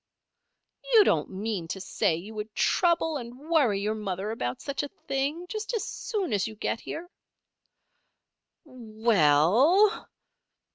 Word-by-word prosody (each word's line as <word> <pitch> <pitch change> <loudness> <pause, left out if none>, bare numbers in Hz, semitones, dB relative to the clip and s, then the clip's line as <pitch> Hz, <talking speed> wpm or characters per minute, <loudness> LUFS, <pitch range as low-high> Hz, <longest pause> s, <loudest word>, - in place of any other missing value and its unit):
"You 430 - +9
don't 155 - +1
mean 195 -3 -4
to 180 +4 -5
say 185 -3 0
you 195 +7 -8
would 215 0 -7
trouble 340 -3 +2
and 240 -1 -8
worry 285 -8 +1
your 210 +1 0
mother 205 -1 -4
about 125 - -3
such 280 -1 -3
a 290 - -4 0.2
thing, 280 +6 -1
just 435 +4 -4
as 445 - -1
soon 395 - -3
as 200 0 +1
you 220 - -8
get 220 - -2
here?" 340 +2 -7 1.6
"We 230 -4 -2
ell!" 220 - +4
225 Hz, 140 wpm, -27 LUFS, 200-320 Hz, 1.6 s, You